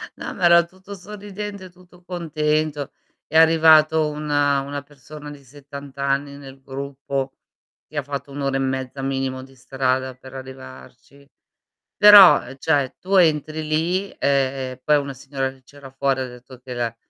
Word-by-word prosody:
No - - -7
ma - - -7
era 170 0 +7
tutto 190 +3 -12
sorridente, 200 0 -8
tutto 180 0 -21
contento. 155 -4 -2 0.3
È 160 - 0
arrivato 160 -1 +5
una 145 -2 0
una 140 +1 -5
persona 145 +1 -12
di 140 -1 -13
70 140 +1 -12
anni 140 +1 -1
nel 135 -1 -13
gruppo, 135 0 -5 0.6
che 155 - -9
ha 145 - 0
fatto 140 0 -6
1 140 - -6
ora 135 -1 0
e - - -2
mezza 130 0 -3
minimo 135 -1 -3
di 135 0 -16
strada 130 0 -2
per 130 0 -14
arrivarci. 130 +1 -12 0.7
Però, 205 -3 +9
ehm, - - -10
cioè 140 -2 0
tu 195 +2 -2
entri 155 -2 +2
lì, 175 +6 0
e - - -21 0.5
e 130 0 -12
poi 150 +2 +4
una 140 -1 -4
signora 135 0 -4
che 130 -1 -21
c'era 140 +1 -14
fuori 135 0 -1
ha 130 - -3
detto 125 +1 -14
che 125 0 -9
la 120 -2 -3
140 Hz, 165 wpm, -22 LUFS, 135-155 Hz, 0.7 s, Però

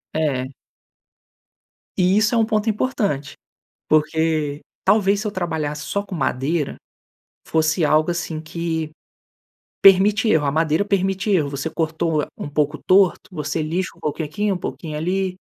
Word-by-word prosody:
É. 140 -4 -1 1.4
Isso 200 +5 +3
é - - +3
um 225 - +4
ponto 215 -1 0
importante, 205 - -1 0.6
porque, 155 -1 +1 0.2
talvez, 205 -1 +3
se 215 - -3
eu 210 - -3
trabalhasse 160 -5 -3
só 200 - -2
com 200 - -9
madeira, 145 0 -1 0.7
fosse 160 +1 +1
algo 155 +2 +3
assim 170 -2 -3
que 160 0 -3 0.9
permite 200 +3 +6
erro. 160 -8 +3
A - - +1
madeira 160 +4 +1
permite 195 0 0
erro. 160 -8 +2
Você 140 +3 -3
cortou 160 -1 -1
um 145 - -6
pouco 150 +1 0
torto, 190 -1 +4
você 155 -1 -3
lixa 170 +5 -2
um - - -22
pouquinho 155 0 -3
aqui, 205 +8 -1
um 190 - 0
pouquinho 155 -3 -5
ali, 185 +3 -1
165 Hz, 145 wpm, -21 LUFS, 155-195 Hz, 1.4 s, permite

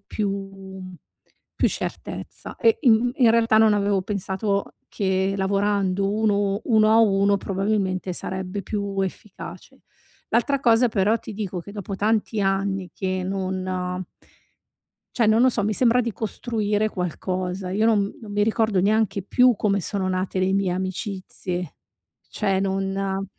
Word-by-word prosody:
più, 200 +1 -3
mhmm 195 -1 -8 0.7
più - - +5
certezza. - - -6
E 230 -2 +3
in 240 -1 +4
in 245 -6 +5
realtà, 225 -1 +4
non 220 -1 +5
avevo 200 -1 +1
pensato 200 +1 -2
che 190 0 0
lavorando 195 0 +1
uno 205 -2 +1
uno 215 -2 +4
a 220 - +5
uno 200 -2 +3
probabilmente 195 -2 -1
sarebbe 190 +2 -4
più 200 -1 -3
efficace. 190 +1 -8 0.5
L'altra 275 +4 +2
cosa 235 0 +4
però 215 +1 +2
ti 215 - -9
dico 195 -4 -4
che 200 - -11
dopo 200 -1 -5
tanti 215 +1 0
anni 195 -1 0
che 185 -1 -2
non 185 -1 -3 1.1
cioè, 235 - +3
non 220 +2 +4
no 255 - +6
so, 220 -4 0
mi 215 +1 0
sembra 245 +2 +3
di 235 -1 -2
costruire 215 -1 -1
qualcosa, 185 0 -3
io 215 +3 +1
non 220 -2 +4
m 200 - -4
non 215 - -9
mi 205 0 +2
ricordo 220 -2 +1
neanche 205 0 +1
più 250 +3 +4
come 200 -1 +1
sono 190 +2 -1
nate 185 0 -2
le 185 +1 +1
mie 195 -2 +1
amicizie. 185 -2 -4 0.5
Cioè, 190 -1 0
non 195 0 -1
200 Hz, 145 wpm, -23 LUFS, 190-215 Hz, 1.1 s, no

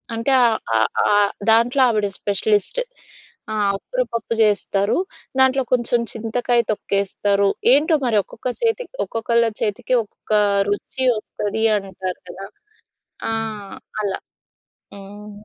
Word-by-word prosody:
అంటే, 230 +4 -1
ఆహ్, 230 -2 +3 0.2
ఆహ్, 110 - +2 0.3
ఆహ్, 205 -1 +3 0.2
దాంట్లో 235 +4 +4
ఆవిడ 210 -3 +1
స్పెషలిస్ట్. 205 - 0 0.7
ఆహ్, 215 - 0
ఆకుకూర - - -3
పప్పు 230 0 -2
చేస్తారు. 205 -1 +1 0.4
దాంట్లో 265 0 +4
కొంచెం 240 -1 +2
చింతకాయ 235 +2 0
తొక్కేస్తారు, 200 0 0 0.2
ఏంటో 310 +4 +4
మరి 230 -3 +2
ఒక్కొక్క 250 - -6
చేతికి, 465 +2 -1
ఒక్కొక్కళ్ళ 235 +1 +1 0.2
చేతికి 210 +4 0
ఒక్కొక్క 210 - -16 0.4
రుచి 205 +5 -2
వస్తంది 215 0 -3
అంటారు 190 -2 -5
గదా! 195 +2 -8 0.8
ఆ! - - -1 0.7
అలా, 195 -2 -2 0.8
హ్మ్. 205 +1 -11
215 Hz, 115 wpm, -21 LUFS, 200-240 Hz, 0.8 s, దాంట్లో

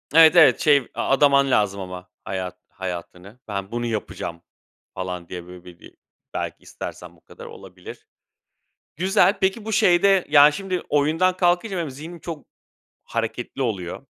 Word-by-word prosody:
Evet, 165 +1 +8
evet 170 -2 +7
şey 140 -4 +3
a - - -3
adaman 140 0 +4
lazım 100 -4 +1
ama 90 -1 -8 0.2
hayat 90 -1 -5
hayatını. 95 +3 -8
"Ben 100 -2 -5
bunu 120 0 -3
yapacağım." 105 -6 -5 0.5
falan 90 -2 -5
diye, 90 -1 -7
böyle, 90 -1 -12
bi 90 -1 -14
bi - - -15 0.4
belki - - -5
istersem - - -9
bu - - -26
kadar - - -13
olabilir. 90 -2 -12 0.9
Güzel. 190 +2 +3
Peki, 195 +3 0
bu 220 - -4
şeyde, 195 -1 +4
ya, 145 0 +7
şimdi 185 +1 -3
oyundan 160 +6 +2
kalkınca 180 +3 +1
benim 165 -5 -3
zihnim 160 +6 -10
çok 160 -4 -8 0.6
hareketli 115 +3 -4
oluyor 100 -9 -3
135 Hz, 150 wpm, -23 LUFS, -, 0.9 s, Evet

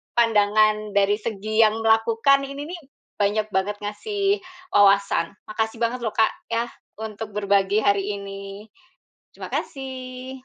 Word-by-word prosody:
pandangan 215 -2 +3
dari 200 +1 +4
segi 215 0 +1
yang 220 +1 +2
melakukan, 225 +5 +4
ini 280 +2 -6
nih 350 -2 -7 0.3
banyak 210 +1 +1
banget 200 +2 -1
ngasih 395 - -1 0.3
wawasan. 200 -4 +4 0.2
Makasih 220 +1 -2
banget 235 +1 -1
lho 220 - -1
Kak 220 - +3 0.2
ya, 230 +1 0 0.3
untuk 220 -1 -6
berbagi 200 0 +2
hari 200 -1 +3 0.2
ini. 195 +1 -8 0.7
Terima - - -8
kasih. 260 -1 -5
215 Hz, 125 wpm, -23 LUFS, 205-235 Hz, 0.7 s, dari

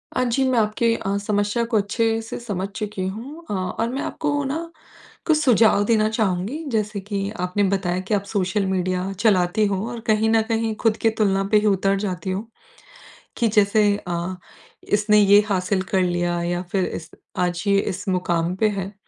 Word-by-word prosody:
अ, - - +2
जी, 250 +2 +1
मैं 245 -3 +3
आपके 220 +2 +1
अ, 200 -1 -2
समस्या 205 +2 0
को 220 - +3
अच्छे 225 +2 0
से 225 - -7
समझ 200 -5 -3
चुकी 205 -3 -4
हूँ 260 - -7
अ, - - -2
और 190 +4 -2
मैं 265 +3 -3
आपको 290 -1 -2
ना 325 +5 -4 0.5
कुछ 315 -2 +3
सुझाव 230 -7 +4
देना 215 -1 +3
चाहूँगी। 220 - -1
जैसे 210 -2 -1
कि 200 0 -3
आपने 180 +3 0
बताया 185 -2 0
कि - - -1
आप 200 -1 +1
सोशल 195 0 0
मीडिया 185 0 -1
चलाती 205 -1 +3
हो 200 +1 -2
और 235 - -6
कहीं 220 0 +3
न 225 0 +4
कहीं 225 -1 0
खुद 225 -1 +3
की 225 - +2
तुलना 200 -3 +1
पे 215 - +6
ही 210 - -2
उतर 195 0 +2
जाती 185 -2 -3
हो 200 +5 -4 0.9
कि 235 - +2
जैसे 210 0 +3 0.2
अ, 175 +2 -3 0.6
इसने 210 0 +4
ये 205 0 +7
हासिल 185 0 0
कर 190 - +3
लिया 175 -1 0
या 175 +1 -1
फिर 190 -2 +1
इस 165 - -6 0.3
आज 175 -1 -1
ये 200 0 +4
इस 195 0 -4
मुकाम 175 -1 0
पे 215 +3 +2
है। 195 -1 -4
205 Hz, 190 wpm, -22 LUFS, 185-225 Hz, 0.9 s, ये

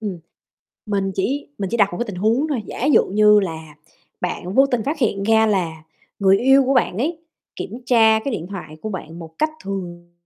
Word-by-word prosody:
ừm, 200 -5 -4 0.7
mình 195 -2 -1
chỉ 275 +9 -2
mình 195 -2 -3
chỉ 235 - 0
đặt 205 -3 +4
một - - -5
cái 240 - -2
tình 200 - -7
huống 225 +10 +1
thôi, 255 -7 -2
giả 250 - -5
dụ 295 - +5
như 210 +1 +5
là 160 -5 -6 0.5
bạn 180 +1 -4
vô 270 +3 +6
tình 245 -4 -1
phát 295 +2 -2
hiện 205 -6 0
ra 220 +1 +4
là 170 -7 -1 0.4
người 195 -1 +4
yêu 270 +2 +5
của 270 - +2
bạn 210 -6 +1
ấy, 320 +6 -1 0.4
kiểm - - -5 0.2
tra 225 -3 +5
cái 275 - -2
điện 170 -3 -5
thoại 155 -6 -8
của - - -4
bạn 170 -5 -7
một 160 -1 -11
cách 310 - +1
thường 175 -3 -6
205 Hz, 215 wpm, -21 LUFS, 180-240 Hz, 0.7 s, vô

